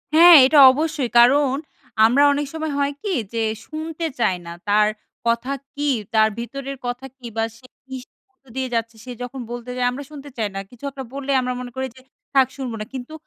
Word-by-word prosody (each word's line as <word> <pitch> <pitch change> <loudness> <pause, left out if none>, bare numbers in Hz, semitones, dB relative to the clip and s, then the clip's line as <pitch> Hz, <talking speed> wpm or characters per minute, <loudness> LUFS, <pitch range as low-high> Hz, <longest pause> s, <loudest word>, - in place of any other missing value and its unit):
হ্যাঁ, 340 +1 +10
এটা 295 +3 +3
অবশ্যই। 295 -3 -2
কারণ, 265 +2 +5 0.5
আমরা 265 +6 +4
অনেক 290 +1 -1
সময় 315 -1 -3
হয় 285 0 0
কি? 405 - -2 0.2
যে 230 - -1 0.3
শুনতে 320 +1 -5
চাই 190 -5 +2
না 170 - -7 0.2
তার 210 +1 +4 0.4
কথা 235 +3 0 0.2
কি? 290 - -4 0.3
তার 220 0 +5
ভিতরের 275 +3 -6
কথা 245 +2 -4
কি? 250 - -14
বা 225 - +2
সে 255 - -20 0.2
কিসে 260 -1 -9 0.2
মধ্য 265 +1 -47
দিয়ে 260 -1 -1
যাচ্ছে? 230 0 -2
সে 250 - -7
যখন 260 +2 -7
বলতে 240 0 -7
চায়, 250 -1 0
আমরা 280 +3 -6
শুনতে 285 -1 -10
চাই 215 -2 -1
না। - - -2
কিছু 245 +2 -18
একটা 270 -1 -7
বললে 280 0 -3
আমরা 250 0 -2
মনে 245 -1 -7
করি 265 0 -2
যে, 260 - -16 0.3
"থাক 265 -2 +5
শুনবো 255 -4 -4
না।" - - -4
কিন্তু 260 +4 -7
265 Hz, 205 wpm, -21 LUFS, 245-285 Hz, 0.5 s, হ্যাঁ